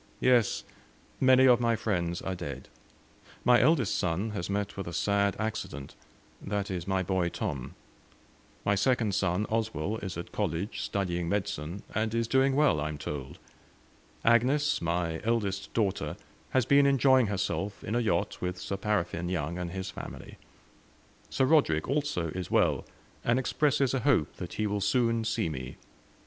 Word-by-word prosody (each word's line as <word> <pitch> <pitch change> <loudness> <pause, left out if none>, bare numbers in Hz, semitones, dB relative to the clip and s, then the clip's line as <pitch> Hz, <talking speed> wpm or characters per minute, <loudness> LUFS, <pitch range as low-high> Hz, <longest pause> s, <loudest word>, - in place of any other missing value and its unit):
"Yes, 125 -4 +3 0.6
many 130 0 +6
of 125 -2 +6
my 115 -1 +2
friends 90 -6 -2
are 95 - -2
dead. 70 -7 -7 0.8
My 120 -1 +6
eldest 130 -6 +3
son 90 +4 -1
has 100 -4 -4
met 100 0 -2
with 95 -2 -5
a 85 - -5
sad 100 +3 +1
accident 100 -10 -4 0.5
that 100 0 -3
is, 90 -1 -4
my 95 -1 +1
boy 95 -2 0
Tom; 75 - -4 0.9
my 100 - +3
second 110 0 +1
son, 95 +1 +1
Oswell, 110 -3 -1
is 95 -6 -6
at 85 - -7
college 100 0 -2
studying 90 -4 -2
medicine, 95 -3 -3
and 110 +1 -1
is 115 -1 +1
doing 135 +2 +3
well 145 - +3
I 75 - -1
am 75 - -5
told. 70 -1 -6 0.9
Agnes, 130 +6 +3
my 85 -1 -1
eldest 105 -4 -1
daughter, 105 -4 0 0.3
has 130 -3 +2
been 140 +2 +5
enjoying 130 -3 +4
herself 100 0 -2
in 105 - -3
a 120 - +2
yacht, 110 -3 0
with 90 0 -2
'Sir 100 - -4
Paraffine' 90 -4 -1
Young 85 -1 -2
and 90 -1 -3
his 95 +2 -5
family. - - -9 0.9
Sir 130 - +2
Roderick, 130 - +3
also, 140 - -1
is 90 +2 -5
well, - - +2 0.4
and 120 +1 +2
expresses 140 0 +1
a 135 - +1
hope 125 - +1
that 90 - -6
he 110 - -1
will 105 -1 -1
soon 115 +2 +2
see 110 - 0
me. 65 -4 -6
100 Hz, 160 wpm, -29 LUFS, 90-115 Hz, 0.9 s, many